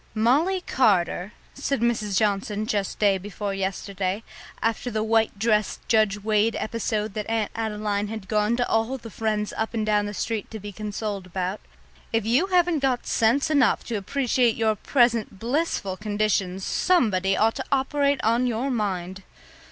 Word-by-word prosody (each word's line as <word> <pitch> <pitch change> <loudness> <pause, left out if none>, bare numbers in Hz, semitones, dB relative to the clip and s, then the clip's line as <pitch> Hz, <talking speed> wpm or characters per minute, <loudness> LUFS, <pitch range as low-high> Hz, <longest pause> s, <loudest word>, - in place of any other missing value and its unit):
"Molly 295 - +2
Carter," 195 - +1 0.2
said 275 -1 -2
Mrs. 215 -4 0
Johnson 210 0 0
just 205 -3 -2
day 200 -2 +3
before 205 +1 -4
yesterday, 195 +1 -2 0.4
after 230 +2 -1
the 215 -2 -1
white 225 -1 +2
dress, 210 -1 +1
Judge 215 -3 +2
Wade 215 +1 +2
episode 215 -2 -2
that 215 0 -4
Aunt 225 -2 0
Adeline 210 -2 -2
had 215 -2 -7
gone 215 +2 +1
to 245 - +1
all 225 +4 0
the 230 -3 -11
friends 215 -1 -1
up 220 +1 -2
and 220 -1 0
down 210 -1 +2
the 205 - -6
street 220 -1 -3
to 220 - -7
be 205 +1 -7
consoled 210 -1 -4
about, 185 +2 -3 0.5
"if 225 -2 0
you 250 +12 +3
haven't 355 -4 +3
got 265 -3 0
sense 240 +7 +2
enough 280 -5 +3
to 235 - -4
appreciate 245 +2 +1
your 220 -1 +2
present 235 -2 +1
blissful 235 - -1
condition, 205 -3 0
somebody 195 - +2
ought 225 +1 +3
to - - -5
operate 280 +1 +1
on 235 +3 +2
your 245 +3 -1
mind." 190 -5 -2
215 Hz, 160 wpm, -25 LUFS, 205-235 Hz, 0.5 s, day